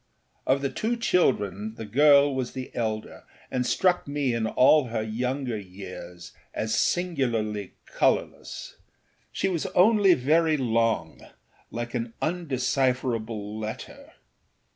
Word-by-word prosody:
Of 135 +1 +2
the 140 - 0
two 235 +2 -1
children 110 - +1
the 110 - -7
girl 140 +5 +5
was 130 -2 -3
the 130 -1 -6
elder, 110 -2 -3 0.3
and 125 -1 -1
struck 180 -4 +2
me 140 -3 0
in 115 -1 0
all 135 +5 +5
her 115 -2 -2
younger 125 +1 -2
years 90 -2 -10 0.2
as 110 0 -1
singularly 120 - 0
colourless. - - -1 0.5
She - - -1
was 180 -1 -1
only 200 -1 +6
very 155 +4 +2
long, 115 - 0 0.5
like 120 0 -5
an 115 -2 -3
undecipherable 125 - -1
letter. 110 0 -7
125 Hz, 120 wpm, -26 LUFS, 110-145 Hz, 0.5 s, only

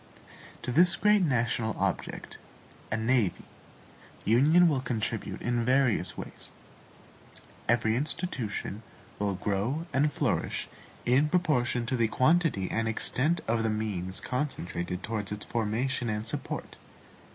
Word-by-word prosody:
To 125 - -2
this 175 +6 +5
great 210 +2 +4
national 120 -7 +1
object, - - -3 0.5
a 105 - +1
NAVY, 115 -3 +1 0.8
union 150 - +5
will 140 -5 +1
contribute 115 -3 -3
in 120 -1 +1
various 125 -7 +2
ways. - - -9 1.2
Every 115 -2 +3
institution 125 - -2 0.4
will 100 -1 0
grow 105 - -1
and 145 +3 +3
flourish - - -1 0.4
in 135 +5 +4
proportion 130 -9 +1
to 125 - -1
the 115 -2 +2
quantity 135 - +2
and 115 0 0
extent 140 +8 +1
of 115 0 +1
the 115 - +1
means 100 -4 -2
concentred 90 -10 -3
towards 105 -3 -3
its 105 0 -5
formation 120 +2 -1
and 105 0 -2
support. 115 - -4
120 Hz, 120 wpm, -29 LUFS, 110-140 Hz, 1.2 s, this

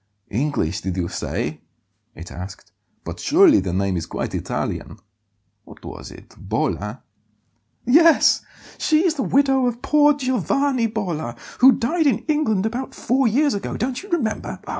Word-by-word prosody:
"English, 115 - -1
did 95 -1 -4
you 85 -2 -1
say?" - - -4 0.5
it 85 +3 -10
asked. 90 +1 -9 0.3
"But - - -7
surely - - +5
the 90 -1 -3
name 95 +1 0
is 80 -2 -3
quite - - -4
Italian. - - -4 0.7
What - - -15
was - - -8
it - - -15
Bolla?" 105 +5 -3 0.8
"Yes; 325 +6 +5 0.4
she 310 +3 +2
is 340 - +3
the 295 - -3
widow 270 -1 +2
of 240 0 -4
poor 295 0 +4
Giovanni 260 - 0
Bolla, 175 - -4 0.2
who 260 +2 +8
died 310 +6 0
in 250 -7 0
England 280 -11 +1
about 245 +4 -4
four 260 +1 +1
years 280 +6 +2
ago, 200 -1 -4
don't 250 +2 -2
you 400 - -13
remember? 270 -11 -2
245 Hz, 150 wpm, -21 LUFS, -, 0.8 s, who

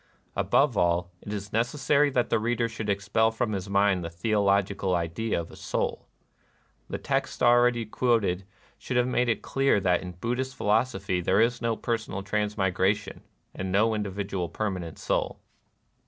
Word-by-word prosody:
Above 140 -4 +2
all, 90 -1 +1
it 105 - -8
is 100 -1 -5
necessary 140 +5 +2
that 125 -3 0
the 115 - +3
reader 115 +1 0
should 110 -2 -5
expel 105 +3 +2
from 110 0 -2
his 95 -1 -4
mind 100 -2 +2
the 85 - -4
theolo 100 +3 +2
gical 95 -1 -2
idea 85 +5 -1
of 85 - -7
Soul. - - -3 0.8
The - - -3
texts - - -2
already 120 -1 +4
quoted 110 -5 +1 0.4
should 125 - -2
have 125 - +4
made 125 -1 +1
it 115 - 0
clear 135 -5 +2
that 90 -2 +2
in 90 -1 -7
Buddhist 125 +7 -3
philosophy 100 -4 0
there 95 +3 +2
is 120 +2 +2
no 115 -1 0
personal 110 -4 -3
transmigra 100 -1 +1
tion, 105 -1 -10 0.3
and 95 0 -4
no 110 +4 +3
individual 100 -3 -3
permanent 90 -4 -4
Soul. - - -1
105 Hz, 160 wpm, -27 LUFS, 95-115 Hz, 0.8 s, already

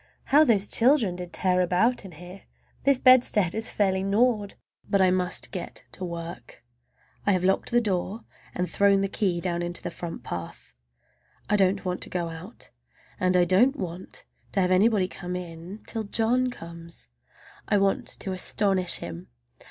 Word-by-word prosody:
How 295 +3 +5
those 210 -8 +3
children 235 -6 +3
did 180 -1 -7
tear 185 -1 +1
about 185 +8 +2
here! 180 +1 -11 0.4
This 275 -1 +5
bedstead 245 -8 +5
is 220 +1 -2
fairly 190 -2 +1
gnawed! 205 +1 +1 0.3
But 200 - +2
I 185 -1 +4
must 180 -1 -1
get 180 -2 -6
to 190 - -9
work. 170 -6 -7 0.6
I 200 - +5
have 180 -1 0
locked 190 +1 +1
the 240 - +3
door 200 +1 -2 0.3
and 180 0 -1
thrown 200 0 +3
the 195 - +1
key 190 -3 -1
down 175 -1 -2
into 175 0 -4
the - - -4
front 165 -7 -7
path. 85 -8 -7 0.8
I - - +5
don't 195 -1 +2
want 180 0 -2
to - - -4
go 175 -2 -2
out, 165 +7 -9 0.5
and 185 0 +2
I 175 - +4
don't 225 +11 +4
want 180 - -7 0.3
to 195 - +2
have 180 0 +1
anybody 195 0 +3
come 180 0 -6
in, 175 +3 -8
till 225 -2 -3
John 235 +5 +1
comes. 170 -6 -10 0.6
I 205 - +3
want 195 0 +1
to 190 - -3
astonish 185 -1 +1
him. 85 0 -7
185 Hz, 165 wpm, -26 LUFS, 180-210 Hz, 0.8 s, How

